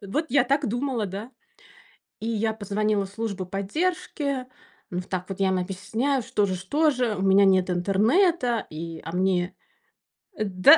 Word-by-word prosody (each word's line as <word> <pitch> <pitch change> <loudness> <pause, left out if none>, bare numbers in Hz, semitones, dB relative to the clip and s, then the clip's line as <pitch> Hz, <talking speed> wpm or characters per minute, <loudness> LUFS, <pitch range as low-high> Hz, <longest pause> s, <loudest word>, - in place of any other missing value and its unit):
Э, 200 - -10
вот 300 +11 -1
я 270 -1 +4
так 275 +2 +1
думала, 240 -2 -1
да. 200 +6 -6 0.9
И 225 - -4
я 220 -1 0
позвонила 210 -1 0
в - - -10
службу 200 -3 -4
поддержки. 280 - -2 0.4
Ну, 180 - -2
в 180 - -14
так 185 -1 -3
вот 195 0 -5
я 190 -1 +3
им 190 - +1
объясняю, 205 +9 -1
что 205 -2 +1
же 185 -1 -1
что 290 - +2
же 245 -5 0
у 190 - -4
меня 195 +1 +6
нет 190 -1 +4
интернета, 230 - +2
и 165 +1 -6
а 165 - -6
мне 185 -1 +1 0.8
Э, - - +2
да 185 - +7
205 Hz, 180 wpm, -25 LUFS, 190-255 Hz, 0.9 s, да